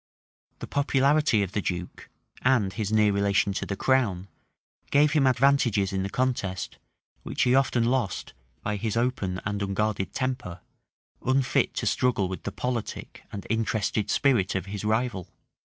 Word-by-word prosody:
The -, -, -7 dB
popularity 140 Hz, -4 st, +2 dB
of 95 Hz, -, -4 dB
the 105 Hz, -, -1 dB
duke, 90 Hz, -2 st, -5 dB, 0.3 s
and 120 Hz, -7 st, +2 dB
his 110 Hz, -2 st, -3 dB
near 105 Hz, -1 st, +4 dB
relation 100 Hz, 0 st, +2 dB
to -, -, -3 dB
the 100 Hz, -, -2 dB
crown, 100 Hz, -6 st, +1 dB, 0.6 s
gave 145 Hz, +1 st, +4 dB
him 140 Hz, -3 st, +3 dB
advantages 120 Hz, -6 st, +3 dB
in 95 Hz, -, 0 dB
the 95 Hz, -, -2 dB
contest, 100 Hz, -8 st, -2 dB, 0.4 s
which -, -, -1 dB
he 125 Hz, -, +3 dB
often 130 Hz, -3 st, +3 dB
lost 115 Hz, -, -1 dB, 0.3 s
by 105 Hz, 0 st, -1 dB
his 110 Hz, +1 st, -2 dB
open 110 Hz, -7 st, -1 dB
and 105 Hz, 0 st, -2 dB
unguarded 100 Hz, 0 st, -1 dB
temper, 130 Hz, -10 st, -3 dB, 0.6 s
unfit 130 Hz, 0 st, +1 dB
to -, -, -2 dB
struggle 125 Hz, -7 st, +1 dB
with 95 Hz, 0 st, -6 dB
the -, -, -2 dB
politic 125 Hz, -3 st, -4 dB
and 100 Hz, -, -7 dB
interested 110 Hz, -2 st, -1 dB
spirit 120 Hz, -11 st, +2 dB
of 95 Hz, -, -2 dB
his 100 Hz, +1 st, -6 dB
rival. 110 Hz, -3 st, -1 dB
110 Hz, 155 wpm, -26 LUFS, 100-130 Hz, 0.6 s, near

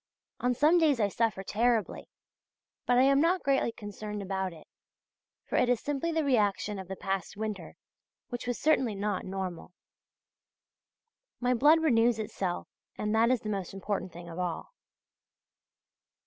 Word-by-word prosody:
On 250 Hz, 0 st, +1 dB
some 310 Hz, +7 st, +5 dB
days 300 Hz, -6 st, +3 dB
I 205 Hz, -2 st, +2 dB
suffer 215 Hz, -2 st, 0 dB
terribly! 225 Hz, +2 st, 0 dB, 0.8 s
but 245 Hz, -, +4 dB
I 255 Hz, -, +6 dB
am 275 Hz, +1 st, +4 dB
not 350 Hz, +3 st, +2 dB
greatly 270 Hz, -3 st, +2 dB
concerned 210 Hz, -1 st, -6 dB
about 190 Hz, -1 st, -2 dB
it, 160 Hz, -2 st, -14 dB, 0.8 s
for -, -, -2 dB
it 245 Hz, -, +3 dB
is 245 Hz, -2 st, +3 dB
simply 290 Hz, +3 st, -2 dB
the 320 Hz, -1 st, +1 dB
reaction 210 Hz, -6 st, +1 dB
of 190 Hz, -, -8 dB
the 190 Hz, -, -5 dB
past 195 Hz, +1 st, -3 dB
winter, 215 Hz, -2 st, -5 dB, 0.5 s
which 245 Hz, 0 st, -5 dB
was 245 Hz, -, -1 dB
certainly 265 Hz, -8 st, +2 dB
not 200 Hz, -1 st, -2 dB
normal. 185 Hz, -2 st, -5 dB, 1.7 s
My 250 Hz, 0 st, +2 dB
blood 300 Hz, +7 st, +5 dB
renews 235 Hz, -5 st, +4 dB
itself, 195 Hz, -4 st, -3 dB, 0.3 s
and 210 Hz, 0 st, -1 dB
that 225 Hz, +1 st, +4 dB
is 255 Hz, -2 st, +2 dB
the 215 Hz, -, -5 dB
most 195 Hz, -2 st, -4 dB
important 195 Hz, -1 st, -3 dB
thing 170 Hz, +1 st, -10 dB
of 170 Hz, +1 st, -7 dB
all. 180 Hz, -, -4 dB
220 Hz, 155 wpm, -29 LUFS, 195-250 Hz, 1.7 s, I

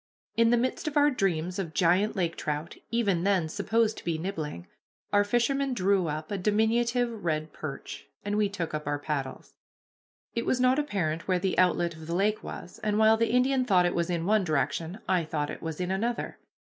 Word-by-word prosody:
In 230 Hz, 0 st, +4 dB
the 240 Hz, -, +4 dB
midst 255 Hz, +6 st, -1 dB
of 300 Hz, -1 st, -1 dB
our 290 Hz, 0 st, +5 dB
dreams 180 Hz, -, -1 dB
of 165 Hz, -5 st, -4 dB
giant 185 Hz, +6 st, +3 dB
lake 170 Hz, -3 st, 0 dB
trout, 150 Hz, +2 st, -4 dB
even 210 Hz, -7 st, +1 dB
then 190 Hz, -4 st, +2 dB
supposed 220 Hz, +7 st, 0 dB
to -, -, -14 dB
be 165 Hz, -2 st, -1 dB
nibbling, 160 Hz, -, -4 dB, 0.5 s
our 205 Hz, 0 st, +5 dB
fisherman 255 Hz, +5 st, +1 dB
drew 190 Hz, -3 st, +2 dB
up 155 Hz, +3 st, -4 dB
a 200 Hz, -, -2 dB
diminutive 230 Hz, +3 st, +1 dB
red 155 Hz, -2 st, -1 dB
perch, 140 Hz, -3 st, -7 dB, 0.2 s
and 205 Hz, 0 st, -1 dB
we 210 Hz, -1 st, +2 dB
took 175 Hz, -6 st, -4 dB
up 150 Hz, -1 st, -4 dB
our 145 Hz, 0 st, 0 dB
paddles. 145 Hz, -3 st, -4 dB, 0.8 s
It 235 Hz, +1 st, -2 dB
was 255 Hz, -, +2 dB
not 255 Hz, +2 st, +4 dB
apparent 175 Hz, -, -2 dB
where 185 Hz, -1 st, +2 dB
the 185 Hz, +1 st, -1 dB
outlet 175 Hz, -1 st, +3 dB
of 160 Hz, 0 st, -11 dB
the 170 Hz, -, -2 dB
lake 210 Hz, +3 st, +1 dB
was, -, -, -8 dB
and 210 Hz, -1 st, 0 dB
while 220 Hz, 0 st, +6 dB
the 230 Hz, +1 st, +1 dB
Indian 255 Hz, +2 st, +3 dB
thought 185 Hz, -7 st, +4 dB
it 175 Hz, -, +1 dB
was 170 Hz, 0 st, 0 dB
in 170 Hz, -2 st, -1 dB
one 210 Hz, +1 st, +3 dB
direction, 160 Hz, +3 st, -1 dB
I 180 Hz, -2 st, +2 dB
thought 150 Hz, -2 st, -2 dB
it -, -, -8 dB
was 160 Hz, -1 st, -5 dB
in 180 Hz, 0 st, -1 dB
another. 230 Hz, +5 st, -2 dB
190 Hz, 205 wpm, -28 LUFS, 165-225 Hz, 0.8 s, while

